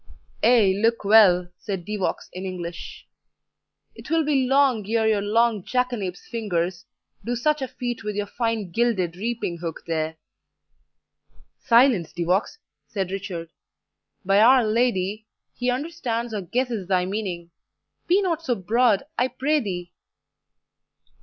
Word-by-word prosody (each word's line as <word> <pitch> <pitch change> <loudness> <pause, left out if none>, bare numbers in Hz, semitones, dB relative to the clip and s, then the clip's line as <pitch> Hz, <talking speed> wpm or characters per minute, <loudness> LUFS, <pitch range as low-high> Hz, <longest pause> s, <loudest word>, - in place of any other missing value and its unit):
"Ay, 225 -5 +5
look 230 0 +1
well," 195 -4 +6
said 190 -4 -5
De 210 +1 -3
Vaux 195 - -2
in 185 - -6
English, 175 -2 -7 0.9
"it - - -12
will 325 -1 +2
be 275 -4 +2
long 270 -4 +3
ere 225 -1 +2
your 215 -2 +2
long 220 +1 +2
jackanape's 240 -8 -2
fingers 185 -6 -2 0.4
do 240 +1 -2
such 300 +4 +1
a 265 - -2
feat 245 -3 -5
with 210 -1 -4
your 205 0 -1
fine 225 -3 -2
gilded 190 -6 0
reaping 210 -4 -3
hook 165 -2 -6
there." 160 -1 -2 1.4
"Silence, 235 - +4
De 175 - -2
Vaux," 185 - 0 0.3
said 190 -3 -3
Richard; 185 -4 -5 0.7
"by 195 +1 +4
Our 250 +2 +6
Lady, 215 -2 0 0.3
he 250 0 -2
understands 245 -4 -3
or 210 - -2
guesses 230 0 -2
thy 185 -2 +2
meaning 185 -4 -4 0.6
be 380 +3 +3
not 335 -4 -1
so 250 -6 0
broad, 225 +2 +2 0.2
I 250 - +3
pray 300 +4 0
thee." 180 -7 -5
215 Hz, 140 wpm, -24 LUFS, 185-245 Hz, 1.4 s, well